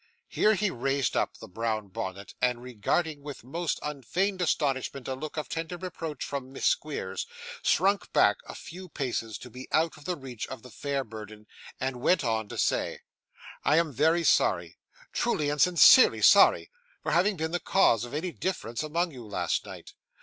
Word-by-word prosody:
Here 215 0 +3
he 205 0 0
raised 135 +1 -1
up - - 0
the - - -10
brown 110 0 -3
bonnet, 95 +1 -6
and 125 -1 +1
regarding 140 - -1
with 145 -4 -8
most 165 +6 -2
unfeigned 175 - -2
astonishment 140 -5 -1
a 135 - -1
look 150 +4 -7
of 155 - -2
tender 165 +2 -4
reproach 165 -5 -5
from 135 -2 -5
Miss - - -4
Squeers, - - -1 0.3
shrunk 195 -1 +2
back 105 - +4
a - - -8
few 180 +3 -10
paces 115 -7 -3
to 125 - -11
be 130 +3 -9
out 160 0 +2
of 145 - -15
the 180 - -1
reach 130 -6 -7
of 130 - -8
the 125 - -12
fair 140 +5 -2
burden, 110 -2 -10 0.3
and 130 -1 -3
went 180 +5 +3
on 110 -3 0
to - - -7
say: - - 0 0.6
'I 150 - +4
am 165 -3 +1
very 160 +6 +3
sorry - - +2 0.4
truly 155 -11 0
and 145 -1 -1
sincerely 180 +8 +7
sorry - - +6 0.3
for - - -1
having 185 +5 +3
been 160 0 -2
the 175 - 0
cause 145 - +3
of 120 +3 -6
any 175 +4 -2
difference 120 -12 -3
among 165 +3 -1
you, 125 -4 -10
last 90 -5 -1
night. - - -10
145 Hz, 180 wpm, -28 LUFS, 120-170 Hz, 0.6 s, sincerely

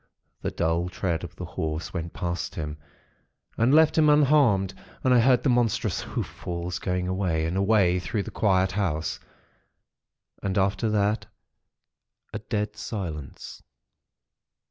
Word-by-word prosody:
The - - -1
dull 85 +2 0
tread 90 -2 -2
of - - -8
the - - -6
Horse 80 +1 -4
went 85 -1 -4
past 85 -1 -4
him, 75 -2 -4 0.8
and 115 +3 +3
left 160 +1 +5
him 155 -1 +5
unharmed; 135 -10 +4 0.3
and 130 - +4
I 125 - +6
heard 125 +1 +4
the 140 - +2
monstrous 115 -5 +1
hoof - - -3
falls 85 +1 -5
going 90 -1 -1
away 90 -4 0
and 80 +3 -2
away 95 -2 +3
through 100 +4 -2
the - - -8
quiet 95 -2 +2
house; 90 -6 -1 1.2
and 95 0 -2
after 100 +3 +1
that 105 +1 +1 1.1
a 105 - -3
dead 105 -1 -3
silence. 85 - -6
95 Hz, 140 wpm, -26 LUFS, 85-110 Hz, 1.2 s, I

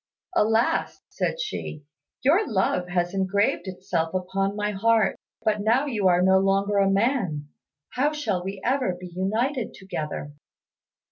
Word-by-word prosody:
"Alas!" 225 -3 +1
said - - -2
she, 155 - -5 0.4
"your 340 - +3
love 190 -3 +1
has 175 0 -1
engraved 195 +2 +1
itself 180 -2 -2
upon 195 +2 -1
my 210 0 -1
heart; 220 +1 +2 0.3
but 215 -2 +1
now 235 +7 +3
you 215 -9 +1
are 180 0 +4
no 190 0 +5
longer 195 +1 +2
a 195 0 +4
man, 195 - 0 0.4
how 280 +4 +1
shall 215 -12 -2
we 195 +1 -5
ever 255 -7 +1
be 180 -1 -9
united 225 +7 -1
together?" 155 -6 -5
195 Hz, 140 wpm, -25 LUFS, 185-230 Hz, 0.4 s, no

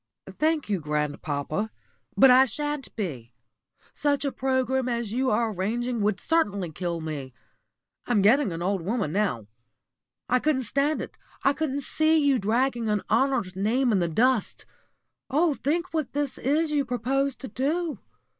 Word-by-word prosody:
"Thank 310 -1 +1
you, 200 -3 0
grandpapa, 150 +4 -2 0.5
but 270 -1 +8
I 260 +1 +7
shan't 295 +2 -4
be. 130 - -5 0.6
Such 285 -1 0
a 280 - 0
programme 260 -1 0
as 235 -3 -2
you 260 +2 +1
are 225 0 +1
arranging 230 +5 -2
would 205 -1 +1
certainly 200 - 0
kill 170 0 -3
me. 140 -5 -6 0.7
I'm 215 -5 +2
getting 245 +2 +4
an 165 +1 -4
old 195 0 0
woman 200 -2 -1
now. 195 - 0 0.8
I 250 - +3
couldn't 270 -2 +1
stand 280 +6 0
it, - - -11 0.2
I 275 - +4
couldn't 285 -2 -2
see 315 +4 +2
you 285 -4 +3
dragging 235 +2 0
an 210 -1 0
honoured 225 -6 +1
name 235 +6 +1
in 200 - +3
the 175 - +1
dust. 235 +6 +1 0.6
Oh, 305 +3 +2
think 335 +6 -2
what 310 -5 -2
this 290 -1 -2
is 300 +4 +1
you 290 -2 +2
propose 270 +2 -1
to 265 - -8
do! 305 +6 -2
250 Hz, 155 wpm, -26 LUFS, 200-280 Hz, 0.8 s, but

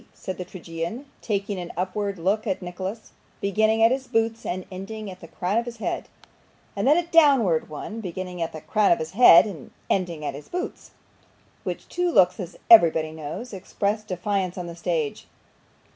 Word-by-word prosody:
said 185 - -6
the - - -2
tragedian, 175 - -6 0.2
taking 200 -2 -2
an 175 -1 -6
upward 195 +2 -2
look 200 +6 0
at 190 - 0
Nicholas, 185 +5 -6 0.3
beginning 220 +3 +2
at 225 - +6
his 265 0 -1
boots 225 -1 0
and 185 +1 -3
ending 195 +2 -6
at 185 - -11
the 165 - -11
crown 185 +6 -1
of 235 - -4
his 235 -1 -7
head, - - -3 0.7
and - - 0
then 295 +4 +6
a 345 - +1
downward 275 - +4
one, 215 +9 -6
beginning 180 -2 -5
at 165 - -1
the 155 - -8
crown 205 +6 +2
of 170 - +5
his 160 0 -5
head, 190 -5 +8
and 185 -10 -8 0.2
ending 170 -5 -1
at - - -2
his 145 +2 -10
boots 360 +1 -5 0.7
which - - -5
two 355 0 0
looks, 180 - +4
as 185 -2 -7
everybody 165 -7 +7
knows, 160 +10 -7
express 200 +2 -2
defiance 190 -1 -2
on 180 - -4
the 170 -1 -7
stage. 170 -4 -2
190 Hz, 185 wpm, -25 LUFS, 175-220 Hz, 0.7 s, head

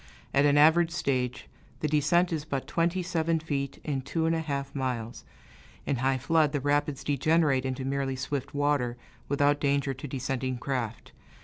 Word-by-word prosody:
At 140 +1 +4
an 145 0 +4
average 160 +3 +6
stage, 130 -6 -2 0.3
the 155 - +1
descent 155 +4 +2
is 155 -2 -2
but 140 -3 -3
twenty 170 +2 0
seven 165 -2 0
feet 140 -4 -3
in 140 -3 -2
two 160 +5 -2
and 165 0 +2
a - - 0
half 140 -3 -3
miles; 125 -4 -3 0.6
in 135 - 0
high 130 +2 +1
flood, 155 +2 +2
the 145 - +1
rapids 145 0 0
degenerate 145 -1 +2
into 130 0 -3
merely 135 -1 -1
swift 135 +1 -3
water, 140 -4 +1 0.3
without 145 +1 +2
danger 140 -1 +1
to 130 +3 -8
descending 130 -1 -2
craft. 120 -3 -4
140 Hz, 170 wpm, -28 LUFS, 130-155 Hz, 0.6 s, average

